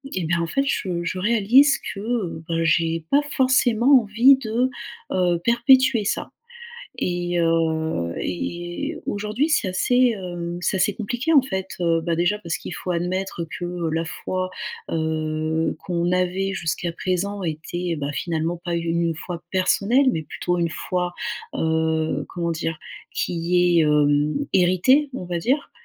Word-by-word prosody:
et 185 - -1
ben 170 +1 0
en 165 - -1
fait 275 +10 0
je 180 -9 -1
je 185 +2 -3
réalise 235 +7 +4 0.2
que, 200 -6 -3
bah, 165 0 0
j'ai 165 +1 +1
pas 280 - +6
forcément 255 -1 +4
envie 235 +6 +5
de, 245 0 0 0.4
heu, 175 -2 +1
perpétuer 240 0 +4
ça. - - -2 0.7
Et, 175 0 -1
heu, 160 - 0
et 175 - -4
aujourd'hui, 215 +9 -1
c'est 210 -11 +1
assez, 245 +7 +3
hem, 175 -2 -5
c'est 180 - 0
assez 190 +2 +2
compliqué 240 +9 -2
en 285 - +8
fait, 190 -7 -4
heu, 165 -1 +2
bah 170 0 0
déjà 175 +5 +1
parce 170 -6 -3
qu'il - - -7
faut 180 - -5
admettre 180 0 -2
que 175 -1 -3
la 165 +1 -1
foi, 185 +2 -4 0.4
heu, 160 0 -1
qu'on 175 -1 0
avait 185 +2 0
jusqu'à 170 -1 -2
présent 190 +3 -2
était, 170 +2 -3
bah, 145 -1 -3
finalement 165 +2 -2
pas 175 - -2
u - - -1
une 165 0 +1
foi 170 +1 -7
personnelle 200 +8 +2
mais 160 - -2
plutôt 175 +4 -2
une 170 -1 +1
foi, 180 +1 -3 0.4
heu, 160 -2 0
comment 170 -1 -3
dire? 165 -1 -3 0.4
Qui 175 0 +2
est, - - +5
hem, 150 0 +3 0.2
héritée, 185 - +4
on 255 - -5
va 175 -1 -3
dire. 265 - 0
175 Hz, 155 wpm, -23 LUFS, 165-210 Hz, 0.7 s, en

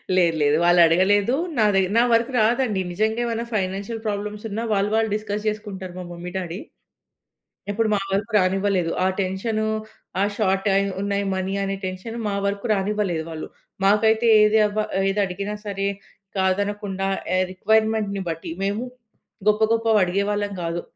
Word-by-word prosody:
లేదు 170 -3 +3
లేదు. 145 +1 +3
వాళ్ళు 175 0 +5
అడగలేదు. 195 +7 +3 0.2
నాది 210 -3 +4 0.2
నా - - +7
వరకు 230 +3 +3
రాదండి. 220 -3 +2
నిజంగా 220 +5 0
ఏమైనా 230 0 -2
ఫైనాన్షియల్ 200 +3 -2
ప్రాబ్లమ్సున్నా, 210 +1 -3
వాళ్ళు 200 +1 +1
వాళ్ళు 220 0 +2
డిస్కస్ 210 0 -4
చేసుకుంటారు. 205 -4 -4
మా - - -5
మమ్మీ, 175 +1 -7
డ్యాడీ. 180 0 -4 1.1
ఎప్పుడు 220 +1 0
మా 205 - +2
వరకు 205 +4 -1
రానివ్వలేదు. 190 -2 +1
ఆ - - +4
టెన్షను, 215 +4 -1 0.5
ఆ - - +4
షార్ట్ 195 -2 +1
అయి 200 0 +2
ఉన్నాయి 200 0 -1
మనీ 190 +1 -2
అనే 195 0 -2
టెన్షన్ 185 +5 -5
మా 200 - -1
వరకు 200 +2 -2
రానివ్వలేదు 195 -4 -1
వాళ్ళు. 160 -1 -6 0.4
మాకైతే 220 +3 +4
ఏది 210 +1 +5
అబ్బా 215 +1 -1 0.3
ఏది 195 - -1
అడిగినా 200 +3 -4
సరే 195 -1 -2 0.5
కాదనకుండా 195 0 -1 0.3
ఎ - - +3
రిక్వైర్‌మెంట్‌ని 215 0 +1
బట్టి. 165 0 -5
మేము 205 +4 -1 0.6
గొప్ప 210 +1 +3
గొప్పవి 225 -2 +3
అడిగేవాళ్ళం 200 +3 0
కాదు. 170 +1 -2
200 Hz, 145 wpm, -23 LUFS, 190-215 Hz, 1.1 s, నా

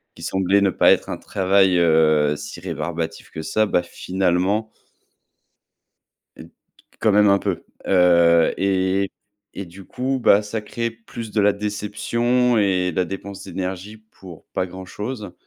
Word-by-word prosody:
qui - - -12
semblait 95 +1 +1
ne 100 - +3
pas - - +4
être - - -3
un - - -3
travail, 95 -1 +2
heu, 80 -3 +3
si - - -8
rébarbatif 80 +1 -5
que 80 - -6
ça, 110 +7 +1
bah 90 -4 +1
finalement 95 +5 -1 1.7
heu - - -10
t - - -20 0.5
quand 110 - +3
même 105 0 +5
un 100 - +4
peu. - - -3 0.2
Heu 85 -2 +4
et 95 0 0 0.4
et 100 - -6
du 90 +3 -13
coup, 130 +5 -3
bah, 100 -1 +6
ça 105 +1 -4
crée 115 +2 -3
plus 115 -1 -9
de 105 - +1
la 105 - +4
déception 115 +4 0
et 95 -3 +1
de - - -11
la 90 - +2
dépense 95 +1 -7
d'énergie 95 +3 -5
pour 95 -6 -15
pas - - 0
grand-chose. 100 +4 -7
95 Hz, 155 wpm, -21 LUFS, 90-105 Hz, 1.7 s, bah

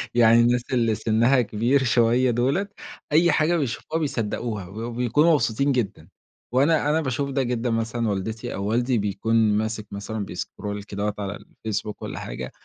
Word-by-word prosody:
يعني 115 -1 +6
الناس 120 +1 +2
اللي 115 -3 +2
سنها 115 +4 +3
كبير 120 +5 +1
شوية 120 +1 +3
دُوّلة، 135 - +1 0.4
أي 165 +3 +5
حاجة 155 +3 +2
بيشوفوها 150 +3 -2
بيصدّقوها، 115 - -3
و 100 +5 -9
وبيكونوا 125 +7 +2
مبسوطين 140 -1 +1
جدًا. 120 -6 -2 0.5
وأنا 145 +3 +3
أنا 155 +2 +2
باشوف 140 0 -2
ده 135 0 0
جدًا 120 -1 -1
مثلًا 115 0 -1
والدتي 105 +3 -3
أو 100 - -4
والدي 120 +4 +1
بيكون 105 +2 -1 0.2
ماسك 110 0 -3
مثلًا 100 +1 -4
بيscroll 100 +3 -5
كدهوة 105 +1 -2
على 100 0 -3
الFacebook 105 -1 -5
والّا - - -5
حاجة، - - -6
115 Hz, 155 wpm, -24 LUFS, 110-130 Hz, 0.5 s, يعني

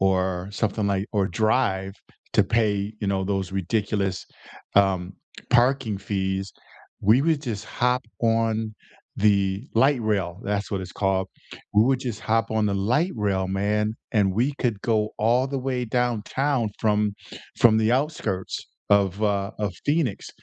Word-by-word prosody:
or 95 -1 +1
something 105 0 -1
like 100 0 0
or 100 -3 +2
drive 95 -2 +1 0.4
to - - +5
pay, 105 -2 +1
you 105 - -2
know, 95 -1 0
those 95 -1 -2
ridiculous, 95 0 -1 0.5
um, 95 -2 +3 0.4
parking 125 -3 +3
fees, 95 0 -2 0.5
we 110 +7 +4
would 160 -1 +2
just 110 -7 -4
hop 125 +1 0 0.2
on 115 -1 +1 0.4
the 100 +3 +2
Light 130 +3 +4
Rail 100 -5 -1
that's 100 0 -2
what 100 - -1
it's 90 -1 -8
called, 95 -1 0 0.5
we 105 - +6
would 130 +1 +2
just 120 -5 -4
hop 115 +1 0
on 110 -1 +1
the 100 - 0
Light 125 - +1
Rail, 100 -3 0
man, 105 +3 0 0.2
and 100 -4 +3
we 125 +7 +1
could 115 -6 0
go 110 -2 +1
all 120 +4 +3
the 135 0 -3
way 130 -1 -2
downtown 125 +2 0
from 105 -1 +2 0.5
from 115 -2 +6
the 110 +1 +2
outskirts 125 -9 -1 0.3
of, 100 0 +3
uh, 100 -1 +1
of 105 -3 -1
Phoenix, 145 -8 0
105 Hz, 150 wpm, -24 LUFS, 95-120 Hz, 0.5 s, we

